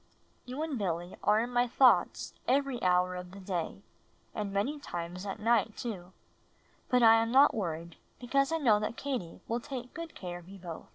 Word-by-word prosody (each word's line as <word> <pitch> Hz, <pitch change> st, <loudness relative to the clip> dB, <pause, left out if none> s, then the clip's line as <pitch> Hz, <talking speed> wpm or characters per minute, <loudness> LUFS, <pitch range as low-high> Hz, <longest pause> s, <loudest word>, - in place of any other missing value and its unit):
You 255 Hz, +5 st, -4 dB
and 300 Hz, -6 st, -3 dB
Billy 175 Hz, -2 st, -2 dB
are 210 Hz, +1 st, +4 dB
in 240 Hz, +2 st, -3 dB
my 245 Hz, 0 st, +2 dB
thoughts 250 Hz, +1 st, +3 dB
every 270 Hz, -2 st, +1 dB
hour 180 Hz, 0 st, +3 dB
of 180 Hz, 0 st, -6 dB
the 200 Hz, -, -9 dB
day 175 Hz, -, -4 dB, 0.5 s
and 205 Hz, -2 st, -3 dB
many 245 Hz, +10 st, -1 dB
times 175 Hz, -4 st, -6 dB
at 195 Hz, -, -4 dB
night, 225 Hz, -1 st, +2 dB
too; 190 Hz, -7 st, -5 dB, 0.8 s
hut 250 Hz, -1 st, +4 dB
I 225 Hz, 0 st, +8 dB
am 230 Hz, 0 st, -1 dB
not 275 Hz, +3 st, +6 dB
worried 170 Hz, -4 st, -4 dB, 0.2 s
because 275 Hz, +4 st, +1 dB
I 325 Hz, -, +2 dB
know 230 Hz, -9 st, +4 dB
that: 215 Hz, +2 st, -3 dB
Katie 250 Hz, -12 st, -4 dB
will 230 Hz, +1 st, -1 dB
take 250 Hz, -1 st, -7 dB
good 335 Hz, -1 st, -7 dB
care 175 Hz, -2 st, -6 dB
of 175 Hz, +1 st, -16 dB
you 195 Hz, -, -10 dB
both. 170 Hz, -3 st, -8 dB
215 Hz, 190 wpm, -31 LUFS, 180-250 Hz, 0.8 s, I